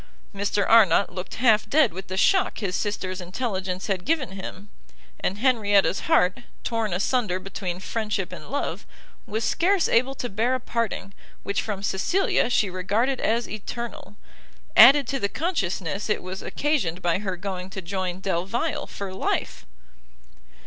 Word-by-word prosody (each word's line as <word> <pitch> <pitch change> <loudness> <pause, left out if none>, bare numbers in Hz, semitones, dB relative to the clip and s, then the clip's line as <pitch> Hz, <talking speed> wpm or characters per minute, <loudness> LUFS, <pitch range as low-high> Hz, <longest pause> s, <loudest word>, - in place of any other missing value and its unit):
Mr 200 0 0
Arnott 200 -4 +5
looked 180 +1 -6
half 225 -3 +3
dead 290 - +4
with 190 +2 -7
the 190 - -4
shock 380 - +3
his 195 -4 -2
sister's 190 -3 -3
intelligence 185 -1 -3
had 190 -3 -1
given 295 - 0
him, 195 +1 -8 0.5
and 195 - -1
Henrietta's 205 -6 +3
heart, 180 +4 +4 0.2
torn 225 -3 -1
asunder 190 +1 0
between 185 -2 -5
friendship 210 -1 -2
and - - -9
love, 285 - -3 0.4
was 220 +2 -2
scarce 365 - +2
able 255 +4 +2
to 250 - -3
bear 235 +5 0
a - - -2
parting, 230 -5 -3 0.3
which 200 - -1
from 205 -3 -4
Cecilia, 240 - +1
she 215 -4 +2
regarded 205 +8 0
as 230 +2 +1
eternal, 215 0 -7 0.6
added 280 0 +9
to 275 - -1
the 200 - 0
consciousness 200 - -2
it 210 - 0
was 185 +1 -6
occasioned 195 - -1
by 175 +1 +2
her 190 -3 -3
going 185 0 -5
to 190 - -6
join 185 0 -3
Delvile 195 - -1
for 195 -2 -6
life! 190 - -2
200 Hz, 150 wpm, -25 LUFS, 185-235 Hz, 0.6 s, added